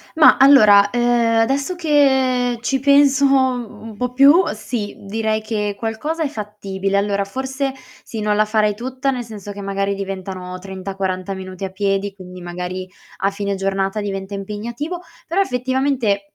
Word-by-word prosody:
Ma 320 -1 +7
allora, 215 -8 +7
uhm, 240 -1 +2
adesso 275 +9 0
che 265 -6 +2
ci 270 +3 0
penso 280 0 +4
un 250 -5 0
po' 250 +1 -2
più, 280 +7 +6
sì, 215 -1 -5
direi 220 +2 -1
che 210 -2 -2
qualcosa 290 +9 -3
è - - +1
fattibile. 200 -5 -3
Allora 200 0 +1
forse 265 +5 -3 0.3
sì, 225 - -7
non 210 0 +1
la 215 +1 +3
farei 215 -1 +2
tutta, 260 +4 -2
nel 250 -2 -3
senso 210 -3 -9
che 200 0 -8
magari 195 0 -1
diventano 190 -2 -6
30-40 190 0 -4
minuti 185 0 -6
a - - -4
piedi, 195 +1 -1
quindi 180 -1 -11
magari 180 +1 -5 0.3
a 195 - +1
fine 200 0 -3
giornata 195 +1 -1
diventa 195 -1 -5
impegnativo. 230 - -5 0.3
Però 350 - 0
effettivamente 250 - 0
215 Hz, 150 wpm, -20 LUFS, 195-260 Hz, 0.3 s, Ma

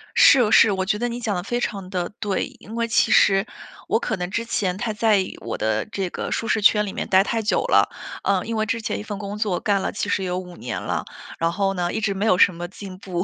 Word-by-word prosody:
是 245 -6 +6
是， 220 -1 +6
我 190 -1 -1
觉 210 +2 0
得 240 +3 -1
你 240 +1 -5
讲 220 -4 -2
得 180 - -3
非 240 +5 -2
常 195 -6 -4
地 180 -2 -2
对。 200 -3 -1
因 220 - -10
为 235 0 0
其 225 - +2
实 195 +1 +5 0.4
我 - - +2
可 - - -2
能 180 -1 -4
之 230 +3 -2
前 190 -5 -1
太 220 +1 -2
在 215 0 +3
意 190 -1 -2
我 115 - -4
的 110 0 0
这 190 -2 -2
个 - - -5
舒 225 - -2
适 220 - +1
圈 210 0 +5
里 195 - -6
面 - - -4
待 190 0 +5
太 225 +2 -1
久 215 - +1
了。 - - +4 0.3
呃， 195 -2 +1
因 230 - -3
为 215 0 0
之 230 +2 -2
前 215 - -3
一 - - -6
份 210 -2 -6
工 205 0 -5
作 210 -4 0
干 200 -2 +1
了 - - -2
其 205 - -3
实 195 - 0
有 180 -1 -2
5 180 -1 -10
年 120 - -5
了， - - -3 0.3
然 165 0 +1
后 195 +2 0
呢， 175 -2 -1
一 - - -1
直 200 -2 0
没 195 +2 -2
有 185 -5 +4
什 185 - +5
么 175 +1 -5
进 190 0 -10
步， 180 -2 -3
200 Hz, 290 characters per minute, -23 LUFS, 185-220 Hz, 0.4 s, 是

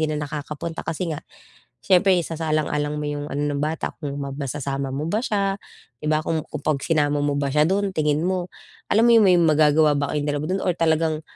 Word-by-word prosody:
'di 155 - +1
na - - -2
nakakapunta 150 +2 -5
kasi 165 +1 -3
nga 150 - -5 0.7
siyempre 190 0 +5
isasaalang-alang 155 -2 -1
mo 150 - -3
yung 145 0 -3
ano 145 +1 -2
ng 140 - -2
bata, 155 +1 -2
kung 145 - -3
ma 140 -1 -4
mai-sasama 140 -1 -3
mo 145 +4 -3
ba 210 +7 -1
siya, 200 -5 0 0.5
di - - -5
ba? 155 - +3
Kung 160 -1 -1
kung 150 -2 -7
kapag 140 -3 0
isinama 145 -2 +1
mo 145 0 +1
ba 140 - 0
siya 150 +2 +3
dun 195 +2 0
tingin 150 -1 +1
mo, 185 -1 -2 0.4
alam 225 +3 +4
mo - - +5
yung 220 -3 +6
may 180 -1 +6
magagawa 155 -2 +4
ba 145 0 -1
kayong 150 -1 -1
2 145 0 -1
dun 190 +1 0
or 180 - +1
talagang 160 -1 +1
155 Hz, 215 wpm, -23 LUFS, 145-170 Hz, 0.7 s, yung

